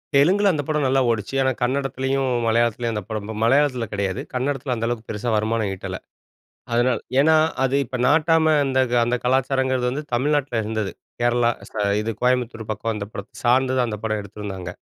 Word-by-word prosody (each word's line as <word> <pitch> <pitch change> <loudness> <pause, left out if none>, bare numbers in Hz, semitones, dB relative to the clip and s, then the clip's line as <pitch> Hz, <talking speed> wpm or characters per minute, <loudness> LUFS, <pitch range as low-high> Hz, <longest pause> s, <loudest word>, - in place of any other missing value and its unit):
தெலுங்குல 195 +8 +4
அந்த 145 -2 -1
படம் 150 -2 0
நல்லா 135 +1 +3
ஓடுச்சு. 110 +3 -2
ஆனா, 130 0 +2
கன்னடத்துலயும், 135 +1 0 0.2
மலையாளத்துலயும் 115 0 +1
அந்த 105 - -3
படம் 110 -1 -4
மலையாளத்துல 130 -1 +3
கிடையாது. 100 -2 -2
கன்னடத்துல 130 0 -1
அந்த 115 0 -2
அளவுக்கு 120 -2 -4
பெருசா 110 +3 -3
வருமானம் 110 -1 0
ஈட்டல. - - -6 0.7
அதனால 120 0 +2 0.2
ஏன்னா, 160 +2 +5 0.3
அது 135 +1 +1
இப்ப 130 +2 -5
'நாட்டாம' 160 +1 +4 0.2
அந்த 130 -1 +1 0.3
அந்த 120 +1 +1
கலாச்சாரங்கிறது 130 -1 +1
வந்து 145 +4 -4
தமிழ்நாட்ல 135 -2 +1
இருந்தது. 110 -2 -2 0.3
கேரளா 120 0 +3 0.2
ஸா 105 - -3 0.2
இது 115 +1 -2
கோயம்புத்தூர் 125 -3 0
பக்கம் 110 +2 -2
அந்த 100 -1 -4
படத்த 100 +2 -9
சார்ந்துதான் 130 0 +3
அந்த 105 - -4
படம் 110 -1 -1
எடுத்திருந்தாங்க. 100 -3 -7
125 Hz, 160 wpm, -22 LUFS, 110-135 Hz, 0.7 s, ஏன்னா